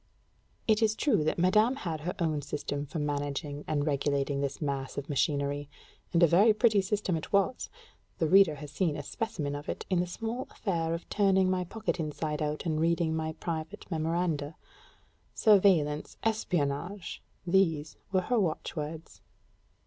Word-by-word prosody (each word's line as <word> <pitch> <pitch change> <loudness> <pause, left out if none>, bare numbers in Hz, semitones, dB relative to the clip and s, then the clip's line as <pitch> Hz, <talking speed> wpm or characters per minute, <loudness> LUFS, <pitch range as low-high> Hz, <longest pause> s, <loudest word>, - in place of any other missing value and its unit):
It 220 0 +3
is 220 -1 +3
true 265 - +2
that 155 - 0
madame 215 +8 +4
had 165 - -4
her 180 +4 -3
own 155 -4 0
system 145 0 -4
for 165 - -6
managing 145 0 -2
and 145 -2 0
regulating 140 -1 0
this 140 -1 -2
mass 140 -3 -3
of 140 0 -4
machinery; 145 0 0 0.4
and 170 0 +4
a - - +8
very 205 +7 +5
pretty 215 -3 +4
system 195 -2 -1
it 160 - -5
was: 200 +5 +1 0.5
the 165 - +1
reader 190 -3 +6
has 145 0 -9
seen 160 -2 0
a 145 - -5
specimen 160 -5 -3
of 145 +1 -6
it - - -4
in 180 - +3
that 180 - 0
small 225 +7 -4
affair 165 -5 -1
of 170 - -8
turning 190 -2 +3
my 180 -1 0
pocket 220 0 -3
inside 150 -1 -3
out 150 +2 -2
and 155 -2 0
reading 165 -1 +2
my 160 0 -2
private 160 -1 -5
memoranda. 160 -2 -1 0.8
Surveillance, 185 -9 +3
espionnage, 180 -4 -1 0.2
these 170 -5 +2 0.2
were 190 -1 +3
her 240 +6 +1
watchwords. 160 -3 -3
165 Hz, 160 wpm, -30 LUFS, 150-190 Hz, 0.8 s, a